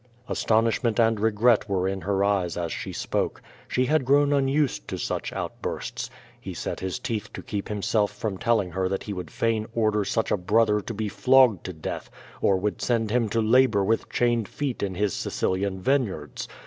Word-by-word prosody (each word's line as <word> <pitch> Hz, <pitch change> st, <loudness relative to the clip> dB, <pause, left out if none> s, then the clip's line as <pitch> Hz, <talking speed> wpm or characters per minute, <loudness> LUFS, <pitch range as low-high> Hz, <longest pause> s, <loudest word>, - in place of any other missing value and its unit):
Astonishment 115 Hz, +1 st, +1 dB
and 115 Hz, -2 st, +3 dB
regret 110 Hz, +1 st, +3 dB
were 95 Hz, -1 st, +1 dB
in 95 Hz, 0 st, -2 dB
her 100 Hz, +1 st, 0 dB
eyes 95 Hz, -4 st, +1 dB
as 85 Hz, -2 st, -2 dB
she -, -, -4 dB
spoke. -, -, -2 dB, 0.3 s
She 130 Hz, -, +1 dB
had 155 Hz, +2 st, +2 dB
grown 145 Hz, +2 st, +4 dB
unused 135 Hz, -, +1 dB
to -, -, -4 dB
such -, -, -3 dB
outbursts. -, -, -4 dB, 0.3 s
He -, -, -7 dB
set -, -, -4 dB
his 95 Hz, -1 st, -3 dB
teeth 110 Hz, -3 st, -4 dB
to -, -, -7 dB
keep 100 Hz, -1 st, -4 dB
himself 105 Hz, 0 st, +1 dB
from 105 Hz, -2 st, -4 dB
telling 110 Hz, -6 st, +1 dB
her 95 Hz, +2 st, -1 dB
that 95 Hz, -, -2 dB
he 105 Hz, -, -5 dB
would 90 Hz, -4 st, -6 dB
fain 110 Hz, -1 st, 0 dB
order 110 Hz, -2 st, +2 dB
such 110 Hz, +3 st, -1 dB
a -, -, +3 dB
brother 105 Hz, +3 st, +2 dB
to 115 Hz, -, -6 dB
be 110 Hz, +1 st, -2 dB
flogged 125 Hz, -1 st, +4 dB
to 90 Hz, -, -5 dB
death, 80 Hz, -, -6 dB, 0.3 s
qr 95 Hz, -1 st, +3 dB
would 105 Hz, +2 st, -2 dB
send 115 Hz, -3 st, 0 dB
him 115 Hz, -2 st, +2 dB
to 115 Hz, +2 st, +1 dB
labor 110 Hz, -2 st, +4 dB
with 110 Hz, +3 st, 0 dB
chained 120 Hz, -3 st, +1 dB
feet 140 Hz, -4 st, -3 dB
in 95 Hz, -2 st, -2 dB
his 100 Hz, 0 st, 0 dB
Sicilian 95 Hz, 0 st, -1 dB
vineyards. 100 Hz, -, -1 dB
105 Hz, 190 wpm, -26 LUFS, 95-115 Hz, 0.3 s, grown